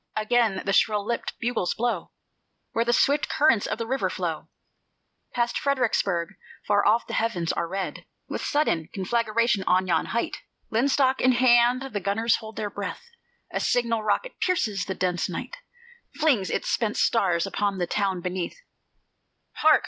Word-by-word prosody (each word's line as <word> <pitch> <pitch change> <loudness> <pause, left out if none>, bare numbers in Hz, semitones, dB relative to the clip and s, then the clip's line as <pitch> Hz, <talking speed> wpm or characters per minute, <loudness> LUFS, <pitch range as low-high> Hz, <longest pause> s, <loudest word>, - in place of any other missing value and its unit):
Again 215 -2 +1
the 195 - 0
shrill 210 0 +2
lipped 235 +1 -3
bugles 235 -7 -1
blow 230 -7 -1 0.6
Where 230 - +1
the 235 - +1
swift 285 +4 +2
currents 295 -9 +3
of - - -2
the 230 - -3
river 265 +4 -1
flow - - -4 0.9
Past 240 0 0
Fredericksburg; 220 -10 0 0.4
far 205 -1 +3
off 225 +3 +3
the - - -7
heavens 195 -8 0
are 170 - -2
red 185 -3 -5 0.2
With - - -4
sudden 170 - 0
conflagration: 230 +1 +1
on 185 +1 +3
yon 175 - +1
height, 235 - -2 0.3
Linstock 265 +2 +2
in 255 0 +4
hand, 245 +1 +4
the 205 - -1
gunners 205 +5 +1
hold 220 -1 -10
their 210 -1 -3
breath; 205 - -6 0.4
A - - 0
signal 230 -2 +1
rocket 215 - -1
pierces 285 - 0
the 190 - -4
dense 180 -2 -1
night, - - -6 0.6
Flings 280 - +2
its - - -2
spent 220 -2 0
stars 180 -7 +2
upon 200 0 -1
the 175 - 0
town 190 -1 -1
beneath: 180 0 -4 1.0
Hark! 310 0 +5
220 Hz, 155 wpm, -25 LUFS, 195-245 Hz, 1.0 s, Hark